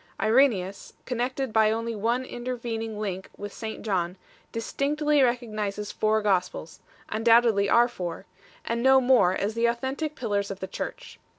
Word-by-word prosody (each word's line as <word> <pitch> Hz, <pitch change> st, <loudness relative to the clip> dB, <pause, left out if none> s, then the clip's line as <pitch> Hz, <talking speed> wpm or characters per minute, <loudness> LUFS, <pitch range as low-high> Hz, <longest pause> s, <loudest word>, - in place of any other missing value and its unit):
Irenseus, 215 Hz, -4 st, +2 dB
connected 255 Hz, 0 st, -2 dB
by 220 Hz, -1 st, +5 dB
only 230 Hz, +1 st, -2 dB
one 235 Hz, +5 st, 0 dB
intervening 235 Hz, -3 st, -4 dB
link 190 Hz, -3 st, -4 dB
with 205 Hz, 0 st, -7 dB
St 220 Hz, -1 st, -6 dB
John, 185 Hz, -3 st, -1 dB, 0.3 s
distinctly 295 Hz, +5 st, 0 dB
recognizes 215 Hz, -5 st, -1 dB
four 215 Hz, 0 st, +1 dB
Gospels 180 Hz, -5 st, -1 dB, 0.3 s
3 215 Hz, -, -1 dB
undoubtedly 225 Hz, -3 st, +4 dB
our 240 Hz, +1 st, +5 dB
four 180 Hz, -8 st, -6 dB, 0.4 s
and 230 Hz, 0 st, -1 dB
no 265 Hz, +1 st, +6 dB
more, 245 Hz, -8 st, +4 dB
as 205 Hz, +3 st, -1 dB
the 230 Hz, +1 st, +2 dB
authentic 265 Hz, +6 st, -2 dB
pillars 205 Hz, -6 st, -1 dB
of 195 Hz, -1 st, -6 dB
the 190 Hz, -, -4 dB
Church. -, -, -7 dB
225 Hz, 150 wpm, -26 LUFS, 200-245 Hz, 0.4 s, no